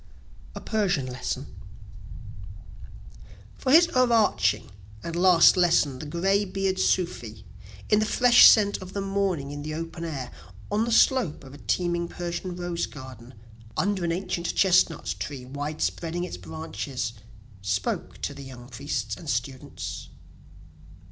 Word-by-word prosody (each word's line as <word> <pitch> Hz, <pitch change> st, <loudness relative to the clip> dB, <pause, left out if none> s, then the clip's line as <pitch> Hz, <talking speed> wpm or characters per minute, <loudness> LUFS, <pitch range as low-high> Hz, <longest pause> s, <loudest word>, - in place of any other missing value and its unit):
A -, -, -5 dB
Persian 195 Hz, -, 0 dB
Lesson 125 Hz, 0 st, -4 dB, 2.1 s
For 255 Hz, -, -2 dB
his 335 Hz, +4 st, +8 dB
o'erarching 235 Hz, -, +2 dB, 0.3 s
and 170 Hz, -, -5 dB
last 175 Hz, -1 st, +6 dB
lesson 165 Hz, -7 st, +2 dB
the 150 Hz, -, -7 dB
greybeard 195 Hz, +3 st, 0 dB
sufi, 115 Hz, -, -1 dB, 0.4 s
In 210 Hz, -, +4 dB
the 215 Hz, -, +1 dB
fresh 245 Hz, +2 st, +7 dB
scent 205 Hz, -2 st, +4 dB
of 185 Hz, 0 st, -9 dB
the 200 Hz, -, -2 dB
morning 195 Hz, -8 st, -1 dB
in 145 Hz, 0 st, -6 dB
the 155 Hz, +1 st, -5 dB
open 165 Hz, +1 st, -6 dB
air, 140 Hz, -7 st, -5 dB, 0.4 s
On 215 Hz, +2 st, +1 dB
the 235 Hz, -, -3 dB
slope 230 Hz, -, +3 dB
of 135 Hz, 0 st, -12 dB
a 145 Hz, -, -12 dB
teeming 175 Hz, +1 st, -1 dB
Persian 175 Hz, +1 st, -5 dB
rose 175 Hz, -1 st, -3 dB
garden, 130 Hz, -3 st, -11 dB, 0.4 s
Under 195 Hz, -1 st, 0 dB
an 170 Hz, -, 0 dB
ancient 175 Hz, -1 st, -3 dB
chestnut 180 Hz, -4 st, +3 dB
tree 135 Hz, -3 st, -6 dB
wide 145 Hz, +4 st, -4 dB
spreading 170 Hz, +1 st, -2 dB
its 180 Hz, -, -5 dB
branches, 105 Hz, -, -5 dB, 0.5 s
Spoke 100 Hz, -1 st, -2 dB
to -, -, -3 dB
the -, -, -10 dB
young 125 Hz, -2 st, -11 dB
priests 140 Hz, +4 st, -3 dB
and 165 Hz, -4 st, -9 dB
students. 125 Hz, +2 st, -4 dB
170 Hz, 135 wpm, -26 LUFS, 135-195 Hz, 2.1 s, his